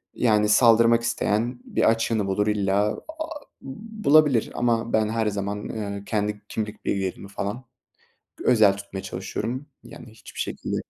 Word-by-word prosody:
yani 105 -3 +2
saldırmak 115 +1 +5
isteyen 120 +1 -1
bir - - +1
açığını 115 -2 0
bulur 105 +2 0
illa, 100 -1 +1
aaa, 315 -1 -7 0.2
bulabilir. 155 - +2
Ama 115 -1 0
ben 110 -1 +2
her 110 0 0
zaman, 100 0 -3
eee, 100 -2 -5
kendi 105 -1 -2
kimlik 105 -1 -5
bilgilerimi 95 0 -2
falan 105 +5 -5 0.7
g - - -8
özel 110 -5 +5
tutmaya 100 -1 -7
çalışıyorum. 115 +8 -4 0.2
Yani - - -12
hiçbir 110 - -11
şekilde - - -3
110 Hz, 140 wpm, -24 LUFS, 100-120 Hz, 0.7 s, saldırmak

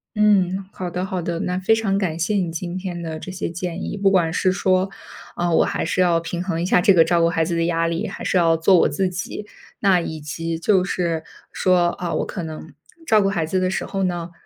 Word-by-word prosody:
嗯， 195 -3 +3
好 180 -1 -4
的 180 +2 -3
好 190 -2 -3
的， 170 0 -3
那 180 +1 -1
非 220 +4 +3
常 200 -3 0
感 175 -5 -1
谢 185 +6 0
你 175 -3 -1
今 175 +2 -5
天 180 -2 -5
的 160 -1 -5
这 185 - -7
些 185 -2 -4
建 175 +1 -4
议。 - - -4
不 195 0 +3
管 175 -4 +2
是 185 - +2
说， 185 0 +1 0.5
啊， 175 0 0
我 - - +5
还 - - -2
是 185 - 0
要 175 -2 +3
平 170 +1 -4
衡 170 -3 -2
一 - - -1
下 180 - +3
这 195 - +5
个 165 -3 +6
照 170 0 +2
顾 165 - +4
孩 165 -1 +1
子 170 - -2
的 165 0 +1
压 165 -1 +1
力， 165 0 -2
还 - - -7
是 - - -1
要 165 -2 +4
做 175 +3 +5
我 - - +3
自 190 -2 0
己。 185 +3 -5 0.3
那 190 -3 +4
以 160 -1 -5
及 165 +3 -4
就 185 +2 +2
是 170 -4 -1 0.3
说， 180 -2 +2
啊， 175 0 -4
我 - - -1
可 190 - -5
能 160 -1 -8 0.3
照 215 -7 +4
顾 195 - +2
孩 170 -5 -1
子 185 +4 0
的 185 - +1
时 190 - -2
候 195 -1 -2
呢， 175 -2 -2
180 Hz, 270 characters per minute, -22 LUFS, 165-190 Hz, 0.5 s, 个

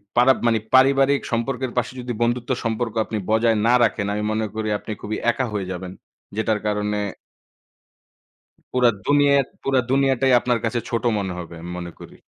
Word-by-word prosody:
পারা 125 +2 +6
মানে 115 -1 +3 0.2
পারিবারিক 135 +1 +4
সম্পর্কের 125 +2 -1
পাশে 125 -1 0
যদি 120 0 -4
বন্ধুত্ব 120 +1 0
সম্পর্ক 115 0 -2
আপনি 110 - -4
বজায় 110 0 +3
না 120 - +5
রাখেন 105 -2 +1
আমি 105 0 -2
মনে 110 0 0
করি 110 0 -2
আপনি 110 - -8
খুবই 110 - -3
একা 130 +2 -2
হয়ে 95 -3 -3
যাবেন। 90 0 -6 0.4
যেটার 110 -1 0
কারণে 105 0 -1 1.8
পুরা 125 -1 +4 0.2
দুনিয়াট 140 -2 +4 0.2
পুরা 135 -1 +2
দুনিয়াটাই 135 -1 +3
আপনার 120 -1 0
কাছে 120 +1 0
ছোট 115 +1 -1
মনে 95 -3 -2
হবে 85 -1 -7
আমি 85 +1 -7
মনে 85 -1 -6
করি। - - -12
115 Hz, 165 wpm, -22 LUFS, 105-130 Hz, 1.8 s, পারা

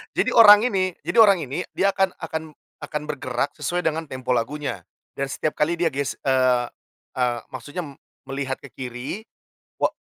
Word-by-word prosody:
jadi - - +2
orang 210 -2 +9
ini 185 -2 0
jadi 170 +3 -3
orang 200 -6 +6
ini, 140 +6 -4
dia 200 +1 +3
akan 190 -1 0
akan 160 -2 -6 0.3
akan 150 +1 -3
bergerak 130 -2 -2
sesuai 180 0 -1
dengan 160 0 -1
tempo 130 -2 -4
lagunya. 125 -3 -2 0.3
Dan 140 - -2
setiap 155 +2 -2
kali 160 +3 +2
dia 170 -1 +1
ges 140 0 -2
eee 130 -2 +3 0.5
eee, 125 -2 0
maksudnya 160 +4 -6
m 140 -2 -11 0.2
melihat 135 -1 -3
ke 140 - -14
kiri 125 - -6 0.6
wa - - +3
145 Hz, 170 wpm, -23 LUFS, 130-170 Hz, 0.6 s, orang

